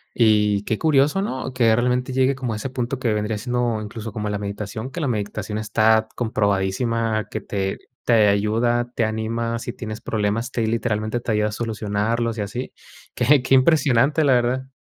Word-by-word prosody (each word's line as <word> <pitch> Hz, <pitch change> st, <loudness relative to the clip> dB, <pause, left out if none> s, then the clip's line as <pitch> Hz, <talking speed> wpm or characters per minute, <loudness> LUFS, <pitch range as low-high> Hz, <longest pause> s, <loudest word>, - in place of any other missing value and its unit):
y 105 Hz, -3 st, +3 dB
qué 110 Hz, 0 st, -2 dB
curioso, 150 Hz, +3 st, +3 dB
¿no? 130 Hz, -9 st, -4 dB
Que 115 Hz, -3 st, +4 dB
realmente 125 Hz, +2 st, 0 dB
llegue 130 Hz, +1 st, +3 dB
como 125 Hz, -4 st, -3 dB
a -, -, -3 dB
ese 110 Hz, +5 st, -4 dB
punto 130 Hz, 0 st, -2 dB
que 120 Hz, -3 st, 0 dB
vendría 105 Hz, 0 st, -1 dB
siendo 120 Hz, -1 st, -1 dB
incluso 110 Hz, +1 st, -6 dB
como 105 Hz, -2 st, -3 dB
la 105 Hz, -, -2 dB
meditación, 105 Hz, +3 st, -5 dB
que 165 Hz, +6 st, -5 dB
la 145 Hz, -, 0 dB
meditación 105 Hz, -2 st, -3 dB
está 110 Hz, 0 st, +3 dB
comprobadísima, 110 Hz, +1 st, 0 dB
que -, -, -4 dB
te 95 Hz, -1 st, -3 dB, 0.3 s
te 110 Hz, -3 st, +4 dB
ayuda, 115 Hz, +4 st, +1 dB
te 115 Hz, -, +2 dB
anima, 115 Hz, +1 st, -2 dB
si 120 Hz, +1 st, -5 dB
tienes 110 Hz, -3 st, -7 dB
problemas, 110 Hz, +3 st, -1 dB
te 120 Hz, -, -2 dB
ahí 110 Hz, -, +1 dB
literalmente 110 Hz, 0 st, -1 dB
te 120 Hz, -, -3 dB
ayuda 105 Hz, 0 st, +1 dB
a -, -, -7 dB
solucionarlos 110 Hz, +1 st, -2 dB
y -, -, 0 dB
así. 105 Hz, +6 st, -5 dB, 0.4 s
Qué 130 Hz, +2 st, +3 dB
qué 125 Hz, -, +1 dB
impresionante, 140 Hz, +1 st, +4 dB
la 140 Hz, -, +4 dB
verdad. 125 Hz, +2 st, 0 dB
115 Hz, 185 wpm, -22 LUFS, 105-125 Hz, 0.4 s, Que